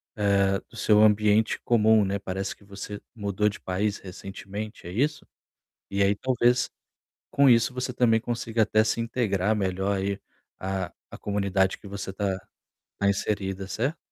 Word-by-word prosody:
eh, 100 -2 +3
do 115 - -13
seu 105 0 +5
ambiente 105 +1 +4
comum, 110 -2 +5
né. 100 +1 -1
Parece 95 0 -4
que - - -22
você 100 +1 -8
mudou 105 -2 0
de 105 - -9
país 100 +3 -1
recentemente, 100 +1 -8
é - - -6
isso? 145 +6 0 0.6
E 100 0 0
aí 100 +1 +3
talvez 125 +1 +2 0.6
com 140 -1 +5
isso 115 0 +4
você 125 0 -3
também 115 -2 +3
consiga 115 -1 -1
até 110 +1 +3
se 115 - 0
integrar 110 -4 0
melhor 95 0 0
aí 100 +1 -1 0.4
à 95 -2 -3 0.2
à - - -8
comunidade 100 -2 0
que 100 - -13
você 95 -1 -5
tá 95 -1 -1 0.6
tá 100 - +2
inserida, 95 -1 -1
certo? 130 +11 -1
100 Hz, 155 wpm, -26 LUFS, 95-110 Hz, 0.6 s, seu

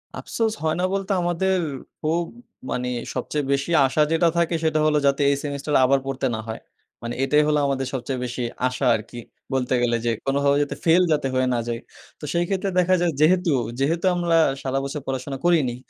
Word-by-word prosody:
আফসোস 225 -2 -2
হয় 155 -1 +1
না - - 0
বলতে 195 0 -2
আমাদের 175 +2 +1 0.4
খুব, 165 +2 0 0.5
মানে 125 0 -2 0.3
সবচেয়ে 150 -2 -2
বেশি 140 +3 0 0.2
আশা 135 +3 +1
যেটা 165 +1 +3
থাকে 170 0 +1
সেটা 155 -1 +2
হলো, 150 -1 +3
যাতে 140 +1 +2
এই 140 - +3
সেমিস্টার 145 +1 -4
আবার 135 +1 +3
পড়তে 135 0 -2
না - - -5
হয়। 110 - -6 0.4
মানে 120 +1 -4
এটাই 150 +2 +4
হলো 150 -1 +2
আমাদের 135 -1 -1
সবচেয়ে 130 0 -3
বেশি 125 +1 -4 0.3
আশা 125 +1 -3
আরকি, 115 +2 -7 0.3
বলতে 130 -1 0
গেলে 120 -1 +2
যে 120 - +2
কোনোভাবে 140 +1 +2
যেতে 145 - -5
ফেল 170 +2 +5
যাতে 150 -3 +1
হয়ে 130 0 +1
না 120 - 0
যাই। 115 -1 -2 0.4
তো - - -19
সেই 170 0 +1
ক্ষেত্রে 195 0 -1
দেখা 185 +1 +3
যায় 175 -1 +2
যেহেতু, 175 +2 +4 0.3
যেহেতু 165 +6 0
আমরা 175 -1 +2 0.2
সারা 135 0 -1
বছর 140 +2 -4
পড়াশোনা 135 +1 -3
করিনি 155 -9 +3
145 Hz, 195 wpm, -23 LUFS, 130-170 Hz, 0.5 s, ফেল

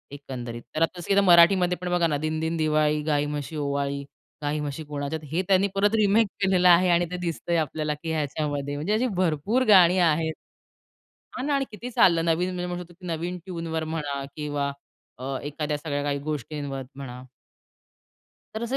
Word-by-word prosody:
एकंदरीत. 125 -4 -7
तर 155 - -1
आता 175 +2 +1
इस 200 - +3
मराठीमध्ये 180 0 +6
पण 180 - -3
बघा 175 -1 +2
ना, 145 -2 0
दिनदिन 160 +2 -2
दिवाळी, 155 -1 +2
गाई 150 -1 +1
म्हशी 145 +1 -4
ओवाळी, 140 -1 -2 0.4
गाई 150 +1 -1
म्हशी 150 +1 -4
कोणाच्यात, 145 +1 -4
हे 175 +3 +1
त्यांनी 195 +1 +4
परत 205 +2 +3
रिमेक 215 +1 +4
केलेलं 185 -2 +4
आहे 180 +1 +6
आणि 175 0 +3
ते 180 - -3
दिसतंय 170 0 -1
आपल्याला 155 0 -1
की 160 - -2
ह्याच्यामध्ये 145 -2 -2
म्हणजे 160 +9 -1
अशी 245 +4 +2
भरपूर 185 - +1
गाणी 185 -3 +7
आहेत. 160 -1 +2 1.0
हां 255 - -3
ना 290 - +2
आणि 270 -1 0
किती 235 +4 -7
चाललं 170 -6 +4
नवीन 170 +2 +1
म्हणजे 180 -1 -3
म्हणू 180 0 -4
शकतो 175 +1 -17
की 180 - -9
नवीन 170 +2 -3
ट्यूनवर 165 -3 -3
म्हणा 145 -3 -3
किंवा 145 -2 -2 0.5
अ, 135 +1 -3
एखाद्या 150 +1 -3
सगळ्या 145 -1 -3
काही 140 -1 -1
गोष्टींवर 145 -1 -4
म्हणा. 125 -2 -8 1.3
तर 220 - -4
असे 250 +3 -1
160 Hz, 175 wpm, -25 LUFS, 145-180 Hz, 1.3 s, गाणी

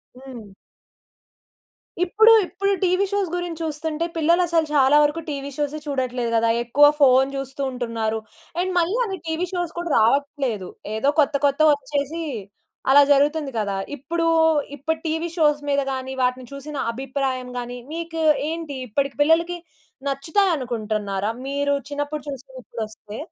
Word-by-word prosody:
హ్మ్. 255 -4 -10 1.6
ఇప్పుడు 440 +5 +5
ఇప్పుడు 395 +3 -1
టీవీ 365 +2 +3
షోస్ 400 -3 0
గురించి 350 -2 -4
చూస్తుంటే, 315 +1 -2
పిల్లలసలు 335 0 +3
చాలా 275 0 +5
వరకు 295 +3 0
టీవీ 280 -1 -4
షోసే 295 +1 -2
చూడట్లేదు 255 -4 -2
కదా! 230 0 +3
ఎక్కువ 280 +5 +5
ఫోన్ 265 -1 +5
చూస్తూ 270 0 -5
ఉంటున్నారు. 230 -3 -2 0.4
అండ్ 370 +1 0
మళ్ళీ 350 +7 +1
అవి 385 -3 -4
టీవీ 320 +3 -1
షోస్ 350 -2 -2
కూడా 345 0 -3
రావట్లేదు. 250 -4 +1 0.3
ఏదో 275 +6 +2
కొత్త 285 0 +3
కొత్తవి 295 +2 +4
వచ్చేసి 285 +3 -3 0.7
అలా 285 +1 +8
జరుగుతుంది 290 +1 +2
కదా! 200 -2 -1 0.2
ఇప్పుడు, 330 +5 -2 0.5
ఇప్పటి 315 +3 -3
టీవీ 320 +2 -1
షోస్ 295 -2 +3
మీద 280 0 +2
గాని, 260 0 -4
వాటిని 250 0 0
చూసిన 285 +1 -7
అభిప్రాయం 260 0 -3
గాని 245 0 -5
మీకు 330 0 -4 0.3
ఏంటి? 325 -3 -5
ఇప్పటికి 275 +5 -1
పిల్లలకి 335 +3 +2 0.5
నచ్చుతాయనుకుంటున్నారా? 240 - -1 0.2
మీరు 285 +1 0 0.2
చిన్నప్పుడు 290 0 -3
చూసినవి 265 -1 -9
ఇప్పుడొస్తే? 220 -2 -7
285 Hz, 130 wpm, -23 LUFS, 255-325 Hz, 1.6 s, అలా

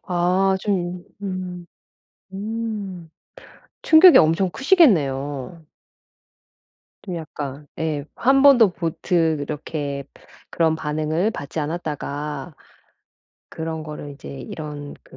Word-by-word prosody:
아 185 +2 +2
좀 180 -3 -2 0.2
음. 185 -2 -5 0.7
음 205 -4 -5 0.7
충격이 330 +2 +8
엄청 165 +4 +3
크시겠네요. 155 - +2 1.4
좀 180 -4 -5
약간 150 -3 -7
예. 155 -3 -2
한 270 +2 +3
번도 245 -8 +7
보트 165 -1 0
이렇게 145 -1 -4 0.5
그런 160 -1 +1
반응을 155 +6 -1
받지 140 -6 -7
않았다가 150 -1 -4 0.9
그런 160 -1 -5
거를 150 -1 -7
이제 140 - -11
이런 145 0 -7
그 - - -17
165 Hz, 180 characters per minute, -22 LUFS, 150-190 Hz, 1.4 s, 충격이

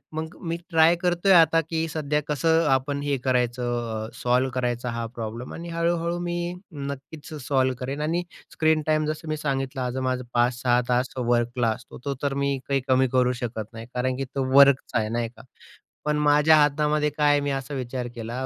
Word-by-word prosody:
मग 160 +1 -5
मी 165 +1 -1
ट्राय 165 +1 +5
करतोय 180 +2 +2
आता 165 -1 +6
की 165 0 -1
सध्या 150 -1 -1
कसं 160 +3 +2
आपण 140 +2 +1
हे 140 -1 0
करायचं, 120 -3 -1
अ, - - -11
सॉल्व्ह 125 +2 +1
करायचा 125 -1 -1
हा 115 0 -3
प्रॉब्लेम 115 +2 -6
आणि 170 +1 -7
हळू-हळू 170 0 0
मी 175 0 -2 0.2
नक्कीच 140 +2 -7
सॉल्व्ह 130 -2 +2
करेन 135 +3 -4
आणि 170 +3 0 0.3
स्क्रीन 155 -1 +2
टाईम 155 0 +2
जसं 155 +1 -4
मी 155 - -1
सांगितलं, 135 -2 -2
आज 125 +1 -2
माझं 130 -1 -1
5-6 120 0 +2
तास 125 +1 +1
वर्कला 120 -1 +1
असतो. 115 +2 -6
तो 140 - -1
तर 140 -1 0
मी 140 -1 +1
काही 135 -1 +1
कमी 130 0 +4
करू 125 -1 +3
शकत 110 -2 -5
नाही 115 0 -8
कारण 125 +1 -1
की 135 - -2
तो 135 - 0
वर्कचा 140 -3 +5
आहे 110 0 -2
नाही 115 0 -1
का, 125 - -16 0.6
पण 150 0 +1
माझ्या 150 +1 +5
हातामध्ये 150 +1 +2
काय 145 -1 +4
आहे 145 - +4
मी 140 0 -1
असा 135 +1 -4
विचार 125 -1 -4
केला. 120 +3 -4
135 Hz, 190 wpm, -25 LUFS, 125-155 Hz, 0.6 s, आता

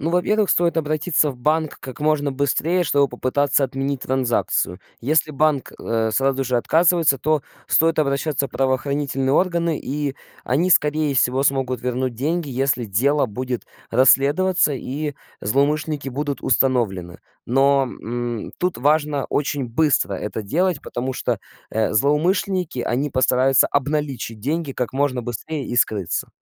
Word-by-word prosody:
Ну, 160 - -1
во-первых, 200 +4 +2
стоит 170 -1 +2
обратиться 155 0 +1
в 130 - -9
банк 155 +4 0
как 130 - -9
можно 150 -1 +1
быстрее, 145 +6 0
чтобы 140 -3 +2
попытаться 140 +3 +1
отменить 135 0 -3
транзакцию. 125 -8 0 0.2
Если 155 +4 +1
банк, 150 -2 +1
э, 115 -1 0
сразу 135 +2 +1
же 125 0 0
отказывается, 165 +2 +3
то 155 +2 +1 0.2
стоит 165 0 +2
обращаться 140 -1 0
в - - -20
правоохранительные 135 +1 0
органы, 170 -1 +1
и 145 0 -3 0.3
они, 160 +9 +1
скорее 150 -2 +3
всего, 130 +1 +2
смогут 135 -3 0
вернуть 125 0 -2
деньги, 155 +6 -2
если 135 -1 0
дело 130 +8 +1
будет 125 +2 -4 0.3
расследоваться 145 +8 +3
и 145 +2 -4 0.3
злоумышленники 145 +5 0
будут 140 +2 -3
установлены. 110 -10 0 0.3
Но, 135 +2 +3
м, 120 -2 -5
тут 180 -1 -1
важно 145 0 +1
очень 145 -1 -1
быстро 125 -3 +1
это 105 +3 -4
делать, 170 - 0
потому 130 +2 -4
что, 120 -4 -2 0.3
э, 110 0 0
злоумышленники, 170 - +1
они 135 +5 -1
постараются 130 +1 +3
обналичить 140 -5 -2
деньги 150 +6 -2
как 125 -2 -3
можно 135 -2 0
быстрее 130 +5 -5
и 120 - -4
скрыться. 100 -7 0
140 Hz, 140 wpm, -21 LUFS, 125-155 Hz, 0.3 s, отказывается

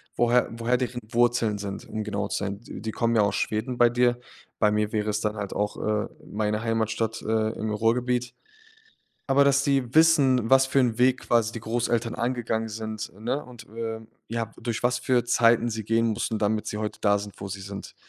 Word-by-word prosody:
woher 120 +1 +3
woher 115 +2 0
deren 125 -1 -3
Wurzeln 120 -3 +2
sind, 100 -1 -6
um 110 0 -4
genau 105 -1 -2
zu - - -2
sein. 100 +1 -4
D - - -9
die 110 - -3
kommen 115 +1 0
ja 110 - +5
aus 100 -1 +1
Schweden 115 +3 -2
bei 120 -1 +6
dir. 120 0 +2 0.4
Bei 105 - +3
mir 105 0 0
wäre 105 0 0
es 105 +1 -2
dann 105 0 -1
halt 100 -2 -4
auch, 105 0 -2
äh, 105 0 -1 0.2
meine 105 +1 -2
Heimatstadt, 115 0 -1
äh, 110 0 0
im 110 0 -2
Ruhrgebiet. 125 +3 0 0.9
Aber 135 +1 +5
dass 140 0 +4
die 135 -2 0
wissen, 140 -8 +5
was 135 0 +6
für 135 - +2
'n 120 -4 +1
Weg 130 +1 +3
quasi 115 -1 +2
die 115 - -6
Großeltern 115 0 -1
angegangen 120 -2 -1
sind, 110 0 -5
ne, 125 +6 -2
und, 125 -2 -12
äh, 115 0 -5 0.3
ja, 115 -1 -3
durch 115 0 -3
was 125 0 +2
für 125 -1 +2
Zeiten 120 -1 +3
sie 110 -1 -4
gehen 115 +1 +2
mussten, 110 0 -1
damit 105 +1 0
sie 105 - -3
heute 105 -1 -4
da 100 -1 +4
sind, 100 -1 -8
wo 100 - -5
sie 100 0 -6
sind. 100 0 -8
115 Hz, 205 wpm, -26 LUFS, 105-120 Hz, 0.9 s, bei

